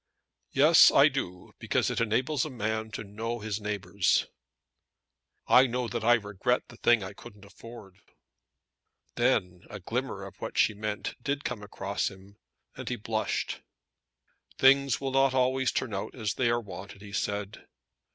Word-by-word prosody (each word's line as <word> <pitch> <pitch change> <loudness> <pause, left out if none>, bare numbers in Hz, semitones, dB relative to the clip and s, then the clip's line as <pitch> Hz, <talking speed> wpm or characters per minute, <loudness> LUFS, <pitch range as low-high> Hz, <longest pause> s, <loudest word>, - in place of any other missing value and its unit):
"Yes 155 +5 +7
I 140 +2 +6
do, 90 -10 -5
because - - 0
it - - -1
enables 125 +5 +1
a 155 - -4
man 110 -3 -3
to - - -4
know 110 +4 -4
his 110 -1 -4
neighbours." 100 -2 0 1.2
"I 130 +1 +6
know 125 0 -2
that 120 -1 -4
I 120 +1 +6
regret 105 +3 -1
the 120 - -13
thing 120 -4 +3
I 95 +2 -7
couldn't 100 0 -14
afford." 105 -2 -13 1.1
Then 90 -1 +1
a 105 -4 -7
glimmer 115 +1 -4
of 95 - -12
what - - -5
she 110 - +4
meant 105 0 -4
did 140 +3 -2
come 105 - -4
across 100 -1 -3
him, 100 +1 -16 0.4
and - - -6
he 125 - -1
blushed. 110 -1 -2 1.0
"Things 135 -1 +4
will 135 -1 -3
not 135 0 +3
always 130 0 +2
turn 120 -5 -2
out 95 - -4
as 110 -5 -2
they 125 -2 +1
are 120 0 +2
wanted," 100 -1 -10
he 100 -1 -11
said. 100 +1 -3
110 Hz, 160 wpm, -28 LUFS, 100-125 Hz, 1.2 s, Yes